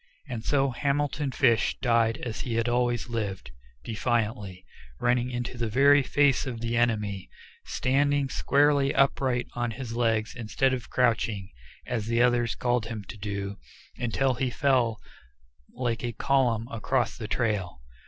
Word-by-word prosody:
And 120 Hz, -5 st, -5 dB
so 135 Hz, 0 st, +2 dB
Hamilton 140 Hz, +2 st, -1 dB
Fish 120 Hz, -4 st, +2 dB
died 115 Hz, -2 st, +2 dB
as 115 Hz, -3 st, -5 dB
he 120 Hz, -3 st, -3 dB
had 115 Hz, +1 st, +1 dB
lived 120 Hz, -6 st, -1 dB, 0.3 s
defiantly, 105 Hz, -, -2 dB, 0.3 s
running 120 Hz, 0 st, +1 dB
into 120 Hz, 0 st, -4 dB
the 115 Hz, -, 0 dB
very 140 Hz, +5 st, +5 dB
face 135 Hz, 0 st, +2 dB
of 120 Hz, -3 st, -4 dB
the 115 Hz, +1 st, -2 dB
enemy, 105 Hz, -5 st, 0 dB, 0.4 s
standing 140 Hz, +1 st, +1 dB
squarely 140 Hz, +1 st, +2 dB
upright 130 Hz, -2 st, +2 dB
on 120 Hz, -1 st, -1 dB
his 115 Hz, 0 st, -6 dB
legs 115 Hz, -2 st, 0 dB
instead 120 Hz, +3 st, 0 dB
of 125 Hz, -3 st, -4 dB
crouching, 115 Hz, -5 st, 0 dB, 0.3 s
as 115 Hz, -3 st, -3 dB
the 115 Hz, 0 st, +1 dB
others 120 Hz, -1 st, +2 dB
called 120 Hz, -1 st, +1 dB
to -, -, -7 dB
him 110 Hz, -3 st, -5 dB
to 110 Hz, -, -7 dB
do, 100 Hz, -1 st, -4 dB, 0.4 s
until 130 Hz, +3 st, 0 dB
he 130 Hz, +1 st, -1 dB
fell 125 Hz, -4 st, +1 dB, 0.8 s
like 120 Hz, -2 st, -2 dB
a 120 Hz, -1 st, -2 dB
column 120 Hz, -2 st, +1 dB
across 120 Hz, +2 st, 0 dB
the 110 Hz, -, -6 dB
trail. 105 Hz, -, -1 dB
120 Hz, 145 wpm, -27 LUFS, 115-130 Hz, 0.8 s, very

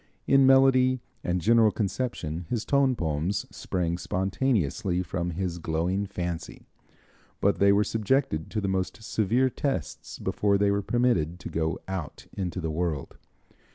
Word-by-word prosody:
In 135 Hz, -1 st, +5 dB
melody 130 Hz, -1 st, +5 dB, 0.2 s
and 90 Hz, +1 st, 0 dB
general 115 Hz, +4 st, +5 dB
conception 95 Hz, -7 st, -3 dB
his 115 Hz, -3 st, -2 dB
tone 140 Hz, -2 st, +3 dB
poems 80 Hz, +2 st, -1 dB
sprang 85 Hz, -1 st, -2 dB
spontaneously 95 Hz, -, 0 dB
from 90 Hz, 0 st, -3 dB
his 90 Hz, 0 st, -3 dB
glowing 85 Hz, +5 st, -1 dB
fancy, 90 Hz, -3 st, -5 dB, 0.7 s
but 100 Hz, 0 st, +2 dB
they 100 Hz, 0 st, +5 dB
were 100 Hz, +1 st, +4 dB
subjected 110 Hz, -, 0 dB
to 110 Hz, -, -2 dB
the 100 Hz, -, -2 dB
most 95 Hz, +3 st, -2 dB
severe 120 Hz, +5 st, +1 dB
tests 135 Hz, -, -3 dB
before 100 Hz, -1 st, +1 dB
they 100 Hz, 0 st, +2 dB
were 100 Hz, 0 st, +1 dB
permitted 100 Hz, -8 st, +1 dB
to -, -, -6 dB
go 80 Hz, +2 st, -1 dB
out 95 Hz, -6 st, -5 dB
into 90 Hz, -2 st, -3 dB
the 80 Hz, -2 st, -2 dB
world. 80 Hz, -3 st, -3 dB
95 Hz, 145 wpm, -27 LUFS, 85-115 Hz, 0.7 s, In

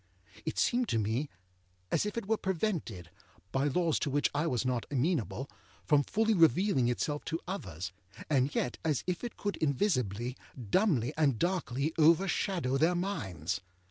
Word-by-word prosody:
It -, -, -2 dB
seemed 245 Hz, -1 st, +2 dB
to -, -, +1 dB
me 110 Hz, +7 st, 0 dB, 0.6 s
as -, -, +2 dB
if 210 Hz, -, -5 dB
it 230 Hz, -, -2 dB
were 220 Hz, +2 st, +2 dB
prevented, 165 Hz, -, -2 dB, 0.4 s
by 135 Hz, +2 st, +1 dB
laws 165 Hz, +2 st, +1 dB
to -, -, -1 dB
which 145 Hz, +1 st, +1 dB
I 150 Hz, +3 st, 0 dB
was 125 Hz, -4 st, 0 dB
not 125 Hz, -2 st, -1 dB
amenable, 140 Hz, -, 0 dB, 0.4 s
from 150 Hz, -2 st, +5 dB
fully 220 Hz, +9 st, +1 dB
revealing 165 Hz, -, +4 dB
itself 145 Hz, +5 st, -1 dB
to 165 Hz, +1 st, -2 dB
others, 90 Hz, -, -5 dB, 0.4 s
and 140 Hz, -1 st, +1 dB
yet 125 Hz, -, -1 dB
as 150 Hz, -5 st, 0 dB
if 180 Hz, +3 st, -2 dB
it 240 Hz, -, -5 dB
could 205 Hz, 0 st, -2 dB
invisibly, 125 Hz, -, 0 dB, 0.4 s
dumbly, 160 Hz, -, +2 dB
and 140 Hz, -6 st, +3 dB
darkly 160 Hz, -, 0 dB
overshadow 165 Hz, -3 st, +3 dB
their 165 Hz, +4 st, +3 dB
minds. 95 Hz, -, -2 dB
150 Hz, 155 wpm, -31 LUFS, 125-185 Hz, 0.6 s, from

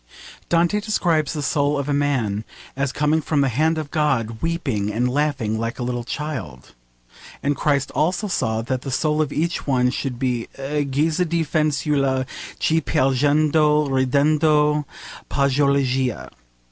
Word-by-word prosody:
Dante 170 Hz, +4 st, +2 dB
describes 170 Hz, -9 st, 0 dB
the 150 Hz, -2 st, -3 dB
soul 145 Hz, +1 st, +1 dB
of 140 Hz, 0 st, -3 dB
a 145 Hz, -, 0 dB
man 125 Hz, -8 st, 0 dB, 0.3 s
as 135 Hz, 0 st, -1 dB
coming 150 Hz, +2 st, +1 dB
from 150 Hz, -1 st, 0 dB
the 135 Hz, -, +2 dB
hand 155 Hz, +7 st, +1 dB
of 155 Hz, -2 st, -5 dB
God 130 Hz, -8 st, 0 dB
'weeping 135 Hz, -12 st, -1 dB
and 120 Hz, +4 st, 0 dB
laughing 130 Hz, -5 st, 0 dB
like 115 Hz, +1 st, -3 dB
a 125 Hz, -, -3 dB
little 120 Hz, -1 st, -2 dB
child,' 120 Hz, -, -6 dB, 0.7 s
and 145 Hz, +1 st, +1 dB
Christ 140 Hz, -1 st, 0 dB
also 180 Hz, +7 st, 0 dB
saw 110 Hz, -, -1 dB
that 130 Hz, +2 st, -2 dB
the 135 Hz, -, -6 dB
soul 150 Hz, +3 st, +1 dB
of 150 Hz, -2 st, -1 dB
each 170 Hz, +2 st, -2 dB
one 125 Hz, -2 st, +2 dB
should 130 Hz, -2 st, -3 dB
be 125 Hz, -2 st, -1 dB
a 145 Hz, +2 st, -2 dB
guisa 155 Hz, +5 st, 0 dB
di 170 Hz, 0 st, +1 dB
fanciulla 140 Hz, -3 st, +1 dB, 0.3 s
che 160 Hz, +1 st, +1 dB
piangendo 150 Hz, +3 st, +2 dB
e 140 Hz, -, -4 dB, 0.2 s
ridendo 150 Hz, +1 st, +3 dB, 0.4 s
pargoleggia. 135 Hz, -4 st, +1 dB
145 Hz, 150 wpm, -22 LUFS, 130-155 Hz, 0.7 s, ridendo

